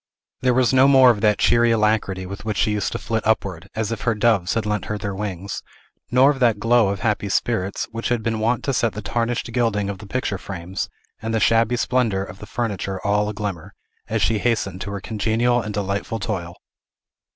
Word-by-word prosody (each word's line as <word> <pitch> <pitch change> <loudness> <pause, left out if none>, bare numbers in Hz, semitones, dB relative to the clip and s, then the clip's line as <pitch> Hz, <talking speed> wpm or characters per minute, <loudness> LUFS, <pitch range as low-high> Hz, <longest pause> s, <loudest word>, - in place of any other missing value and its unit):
There 125 -1 +2
was 130 0 +3
no 130 +1 +6
more 130 -2 +7
of 105 -3 -3
that 105 -1 +3
cheery 120 0 +4
alacrity 105 -4 +1
with 100 +2 -7
which 105 -2 -3
she 105 - +2
used 105 -1 -1
to - - -1
flit 115 0 -2
upward, 95 -5 -1
as 110 0 -2
if 115 - -4
her 115 -2 +1
doves 105 -4 +2
had 115 -2 0
lent 105 0 -1
her 105 - -3
their 100 -1 -4
wings, 100 -1 -4 0.5
nor 130 +3 +5
of 135 - -5
that 115 -4 +3
glow 115 0 +3
of 100 -1 -2
happy 105 -1 0
spirits 100 -1 -1
which 115 0 -3
had 120 -2 0
been 115 -1 -1
wont 115 +2 0
to 135 - 0
set 115 -3 +1
the 105 +1 -6
tarnished 120 +2 -2
gilding 105 -5 +1
of 95 - -8
the 105 - -10
picture 105 -4 -2
frames 90 0 -5 0.3
and 115 0 -2
the - - +2
shabby 115 +2 +3
splendor 115 -6 +1
of 95 - -11
the 105 - -10
furniture 100 -4 -3
all 105 +1 +2
a - - -4
glimmer, 100 -2 -5 0.3
as 110 -2 0
she 105 +3 +2
hastened 100 -5 -1
to 100 - -4
her 100 -1 -5
congenial 115 +3 +1
and 105 -1 -5
delightful 100 +2 -2
toil. 95 -5 -4
105 Hz, 220 wpm, -22 LUFS, 100-115 Hz, 0.5 s, more